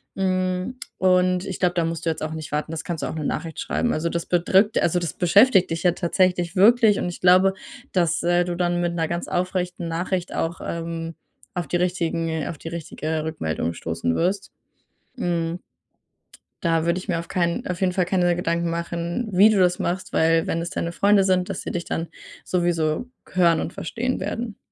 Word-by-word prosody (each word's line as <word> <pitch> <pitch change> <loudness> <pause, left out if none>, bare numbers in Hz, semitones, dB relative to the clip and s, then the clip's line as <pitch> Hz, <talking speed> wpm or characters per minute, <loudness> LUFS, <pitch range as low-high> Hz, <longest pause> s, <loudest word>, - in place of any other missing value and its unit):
Hm, 185 +4 -1 0.2
und 185 0 +3
ich 190 - -5
glaube, 180 -1 +2
da 170 - +1
musst 165 0 -4
du - - +2
jetzt - - -6
auch 155 0 -3
nicht 160 -1 -7
warten. 150 +2 -2
Das 160 -1 -4
kannst 170 -5 -4
du - - -2
auch - - -5
'ne 155 -2 -3
Nachricht 165 +1 -3
schreiben. 240 - 0
Also, 160 +2 -1
das 170 0 -3
bedrückt 190 +4 +3
also, 175 +1 +2
das 170 -3 -3
beschäftigt 190 +1 +4
dich 165 -1 -2
ja 175 - +4
tatsächlich 180 0 +1
wirklich 220 +2 +5
und - - -1
ich 175 - -7
glaube, 185 +2 +5 0.4
dass, 170 -2 +2
äh, 175 +1 +3
du 175 -1 -3
dann 175 0 0
mit 175 -1 0
'ner 165 -1 -1
ganz 170 +1 -3
aufrechten 180 -1 -2
Nachricht 180 +2 -2
auch, 165 +1 -2
ähm, 165 0 -4 0.4
auf 175 -3 -3
die - - -2
richtigen 165 -3 -1
auf 165 - -5
die 165 - -7
richtige 160 -1 -4
Rückmeldung 85 - -2
stoßen 85 0 -2
wirst. 190 +3 -1 0.7
Mhm. 170 -4 -1 1.1
Da 165 -1 +2
würde 170 +2 +1
ich 185 - -11
mir 175 -4 0
auf 165 - -5
keinen 170 -2 -1
auf 180 +1 -4
jeden 185 -1 +3
Fall 180 -1 +1
keine 175 -1 +2
Gedanken 170 -1 -1
machen, 170 +6 -3
wie 200 +4 +6
du 215 - +2
das 180 -1 +3
machst, 180 +2 -3
weil 165 0 +3
wenn 165 - -1
das 170 +1 -3
deine 170 - -3
Freunde 200 +2 +4
sind, 185 -1 +1
dass - - -4
sie - - -4
dich 175 -1 -3
dann 165 - -3 0.4
sowieso 175 +3 0 0.2
hören 170 -3 +4
und - - -4
verstehen 245 +8 -3
werden. 230 -3 -4
175 Hz, 200 wpm, -23 LUFS, 165-185 Hz, 1.1 s, wie